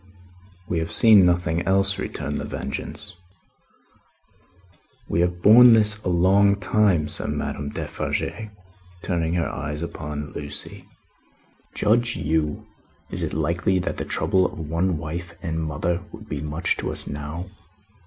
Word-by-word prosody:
"We 85 - -1
have 80 0 -3
seen 105 -5 +6
nothing 85 -1 +1
else," 95 +1 +2
returned - - -4
The - - -5
Vengeance. 100 -3 -6 1.9
"We 85 - +1
have 90 0 -1
borne 120 +3 +9
this 110 -1 +3
a - - -1
long 95 +3 +4
time," 100 -6 +2
said - - -3
Madame 70 0 -3
Defarge, 110 +8 -4 0.5
turning 85 -2 -1
her 85 -2 0
eyes 75 +2 -4
again 85 - -6
upon 75 -1 -6
Lucie. 75 0 -7 0.9
"Judge 120 +3 +2
you! 80 -1 -1 0.5
Is - - -2
it - - -3
likely 85 +5 0
that 90 - -2
the - - -3
trouble 95 -1 +1
of - - -11
one 85 +3 -1
wife 85 +3 -6
and 80 -3 -3
mother 85 +3 -2
would 110 0 -11
be 75 -7 -4
much 75 +3 -1
to - - -3
us - - -1
now?" 75 +6 -6
85 Hz, 145 wpm, -23 LUFS, 80-100 Hz, 1.9 s, borne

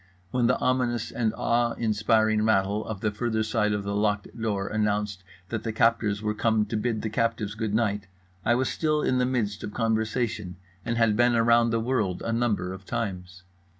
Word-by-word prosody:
When 125 -2 +2
the 125 - +3
ominous 125 -3 0
and 115 -3 0
awe 120 0 +1
inspiring 110 0 +2
rattle 105 -1 +2
on 110 - -4
the 110 - 0
further 110 +1 -1
side 105 -1 +1
of 105 -1 -1
the 100 0 -3
locked 105 0 0
door 105 -4 -2
announced 105 -2 -1 0.3
that 110 -2 -2
the 115 - -2
captors 110 -2 +1
were 105 0 0
come 110 0 +1
to 105 - -4
bid 110 0 -1
the 110 - -1
captives 115 -2 -1
good 110 -1 -2
night, 105 -4 0 0.4
I 120 - +3
was 130 +1 +1
still 155 -1 0
in 130 - +2
the 125 - +2
midst 110 -6 -1
of 105 - -6
conversation 110 -4 -1 0.3
and 115 -1 -2
had 115 -2 +3
been 120 +1 +3
around 115 0 +4
the 115 0 +1
world 110 -7 -1
a 115 - -1
number 110 -6 0
of 95 +1 -10
times. 95 -5 -4
110 Hz, 195 wpm, -26 LUFS, 105-115 Hz, 0.4 s, around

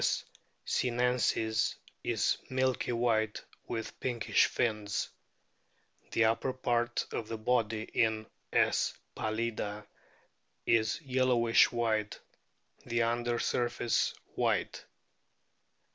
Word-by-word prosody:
sinensis 120 -2 +1 0.3
is - - +1
milky 130 -1 0
white 115 -3 +1 0.2
with 115 -1 -5
pinkish 120 -4 +2
fins. 105 -3 -1 1.0
The 115 - +3
upper 115 +4 +1
part 120 -1 0
of 110 - -3
the 115 - -4
body 110 -1 +1
in 110 -1 0 0.3
S. - - +2 0.2
pallida 110 -1 -2 0.8
is 110 -1 +2
yellowish 125 -3 +4
white, 110 -3 0 0.6
the 120 0 +1
under 120 +1 0
surface 120 -1 0 0.2
white. - - 0
115 Hz, 85 wpm, -31 LUFS, 110-120 Hz, 1.0 s, yellowish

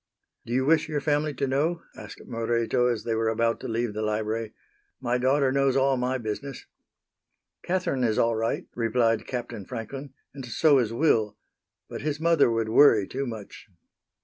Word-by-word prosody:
"Do 120 - -3
you 130 +1 +1
wish 160 +1 +3
your 150 -2 -1
family 150 +1 0
to 140 - -1
know?" 155 +6 0
asked - - -11
Moreto 115 +1 0
as 120 -3 -1
they 115 - -1
were 110 0 +1
about 115 +1 0
to - - -6
leave 115 -1 -2
the 110 - -4
library. 110 +1 -2 0.5
"My 120 +1 -1
daughter 135 +1 +2
knows 135 -1 +2
all 135 0 +3
my 125 +1 -1
business." 125 +4 -6 1.0
"Catherine 180 -8 -1
is 110 -3 +1
all 115 0 +2
right," 115 +1 -1
replied 115 -1 +1
Captain 120 -5 -5
Franklin, 135 +7 -7 0.2
"and 135 -1 -8
so 135 +4 +3
is 115 -3 0
Will, 115 -6 +1 0.5
but - - -7
his 150 0 -2
mother 165 -5 +4
would 115 -1 -1
worry 110 -5 +5
too 135 +1 -4
much." 110 -3 -9
125 Hz, 175 wpm, -26 LUFS, 115-140 Hz, 1.0 s, worry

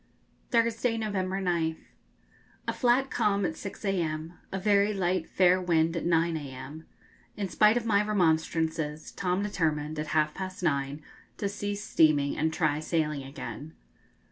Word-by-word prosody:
Thursday, 230 0 +1
November 195 -3 -1
9th. 170 -4 0 0.9
A - - 0
flat 255 +2 +2
calm 205 -4 +1
at 160 - -2
6 200 +1 -8
a.m.; 165 -4 -1 0.2
a 195 - -2
very 200 +1 +3
light 180 -2 0
fair 185 0 +4
wind 165 -2 +2
at 170 - -2
9 165 -1 +2
a.m. 140 +2 -8 0.5
In 200 -2 -2
spite 210 +5 +4
of 235 - -2
my 210 -2 +3
remonstrances, 160 -5 0
Tom 185 0 -1
determined, 155 -6 -1
at 155 - -3
half 150 0 +1
past 185 -1 -6
nine, 140 -2 -1 0.3
to 200 - -1
cease 205 0 -4
steaming 155 -7 +3
and 160 +1 0
try 155 -2 +1
sailing 155 -2 -1
again. 140 +3 -8
175 Hz, 145 wpm, -28 LUFS, 155-200 Hz, 0.9 s, fair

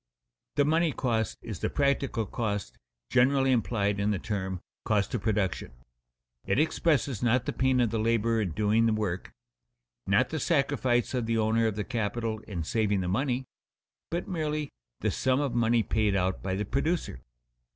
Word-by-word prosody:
The 145 - +3
money 160 +1 +2
cost 115 -4 -1
is 105 -7 -6
the - - -1
practical 140 -5 0
cost 105 - -3 0.4
generally 135 +2 +4
implied 105 -4 +1
in 100 +1 +1
the 105 - +1
term 95 -2 -3 0.2
cost 105 -2 +1
of 120 - -1
production. 100 - -1 0.7
It - - +1
expresses 150 - +1
not 120 +1 +2
the - - -2
pain 130 -1 +2
of 120 -3 +2
the 115 - -1
laborer 115 0 +2
in 90 -6 -2
doing 110 +4 +2
the 110 - +2
work, 100 -4 -2 0.8
not 120 +6 +3
the 155 - -2
sacrifice 135 -6 +1
of 125 -3 -1
the 115 0 +1
owner 110 +1 +2
of 110 - -2
the 105 - -2
capital 115 -1 -2
in 90 -6 -3
saving 105 +2 +1
the 90 - -2
money, 125 +6 0 0.6
but 170 +2 -3
merely 155 -4 -2 0.3
the - - +1
sum 130 0 +1
of 140 -4 -1
money 115 -1 +3
paid 105 -3 +1
out 95 0 0
by 95 -1 -2
the 105 +2 -2
producer. 140 - -1
115 Hz, 170 wpm, -28 LUFS, 105-130 Hz, 0.8 s, generally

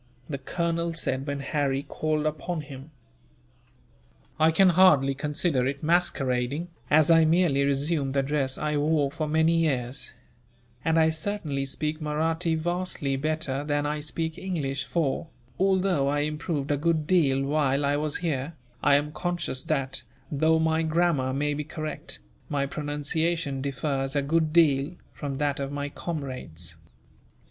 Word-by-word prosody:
the 140 -3 -4
colonel 170 +3 -2
said, 135 -3 -1
when 140 0 -2
Harry 140 -1 0
called 155 0 -1
upon 155 +2 -2
him. 140 0 -10 1.5
"I 160 +1 +6
can 185 +4 +5
hardly 165 -7 +5
consider 145 -1 0
it 140 +2 -4
masquerading, 145 -2 +1 0.2
as 155 +2 +5
I 165 0 +7
merely 160 -4 +3
resumed 140 0 0
the 135 - +3
dress 135 -2 0
I 150 -1 -1
wore 145 -1 +2
for 155 +1 -3
many 160 +2 +3
years; 135 -5 -1 0.7
and 160 0 +2
I 160 0 +5
certainly 160 -5 -2
speak 155 +3 -2
Mahratti 160 +2 0
vastly 175 -4 -1
better 145 -1 -1
than 145 0 0
I 150 +1 -1
speak 160 +2 -3
English 145 -8 -2
for, 165 -1 -1 0.3
although 190 -6 +2
I 145 +1 +1
improved 150 -1 -2
a 145 - +2
good 160 0 +1
deal 145 -6 +3
while 140 -1 +1
I 140 +1 +2
was 150 0 -1
here, 145 0 -1 0.3
I 145 -1 +5
am 145 +1 +1
conscious 170 -5 -2
that, 135 -4 -1 0.3
though 160 +2 +3
my 160 0 +2
grammar 160 -5 +1
may 145 +2 0
be 150 +1 -3
correct, 155 - -5 0.3
my 140 -2 0
pronunciation 150 +1 -1
differs 135 0 -2
a 140 - +2
good 155 +2 +1
deal 155 -1 +3 0.2
from 140 -2 -4
that 145 -1 0
of 140 0 -3
my 145 0 -3
comrades." 130 - -4
150 Hz, 150 wpm, -27 LUFS, 140-160 Hz, 1.5 s, I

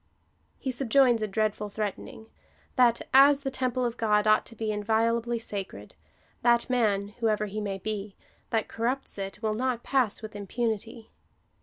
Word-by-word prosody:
He 265 - -3
subjoins 245 -1 +3
a 215 - 0
dreadful 210 0 -1
threatening 210 +1 -5 0.3
— - - -34
that, 240 -3 +4
as 275 +1 +7
the 270 -1 -3
tem, 255 -2 -1
ple 255 0 0
of 235 0 -3
God 210 -2 +2
ought 215 0 +4
to 230 - -12
be 220 0 -2
inviolably 230 +3 +1
sacred, 195 - -7 0.5
that 235 0 +3
man, 205 -5 +1
whoever 215 -2 +1
he 210 +1 -4
may 200 -2 -3
be, 205 0 -5 0.3
that 225 -1 0
coiTupts 240 0 -3
it, 195 +3 -6
will 215 -1 +1
not 245 +1 -1
pass 250 -6 +1
with 215 -1 -8
impunity. 220 +2 -4
225 Hz, 165 wpm, -28 LUFS, 210-240 Hz, 0.5 s, as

